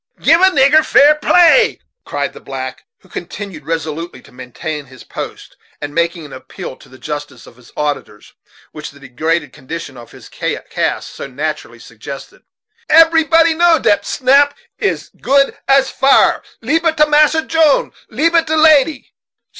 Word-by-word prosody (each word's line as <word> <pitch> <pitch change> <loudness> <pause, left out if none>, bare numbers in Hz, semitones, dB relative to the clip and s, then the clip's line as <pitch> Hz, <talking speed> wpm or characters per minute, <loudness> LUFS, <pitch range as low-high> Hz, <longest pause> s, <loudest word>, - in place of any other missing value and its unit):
"Gib 330 +2 +3
a - - +7
nigger 295 -1 +4
fair 290 0 +5
play!" 350 +8 +3 0.3
cried - - -4
the - - -12
black, - - -8
who - - -22
continued 195 -7 -8
resolutely 165 0 -4
to - - -19
maintain 140 +4 -7
his 130 -1 -15
post, - - -9 0.2
and 145 0 -7
making 170 -1 -2
that 135 - -11
appeal 130 - -9
to - - -19
the 130 - -16
justice 145 +1 -7
of - - -17
his 125 -1 -20
auditors 145 -8 -5 0.4
which 150 -1 -8
the 140 +1 -17
degraded 145 +3 -3
condition 145 -1 -8
of 120 -1 -13
his - - -14
caste - - -3
so - - -8
naturally 140 -3 -5
suggested. 120 +4 -11 0.5
"Eberybody 325 0 +4
know 340 0 +4
dat 205 -7 +1
snap 280 +5 +2 0.2
as - - -2
good 275 0 +2
as 270 -1 +3
fire. 270 +1 +3 0.2
Leab 305 +8 0
it 325 -1 +1
to 300 - +5
Massa 300 +1 +3
Jone 320 -3 +2 0.2
leab 330 +2 0
it 330 -1 +2
to 315 - 0
lady." 310 -2 +3
210 Hz, 160 wpm, -15 LUFS, -, 0.5 s, a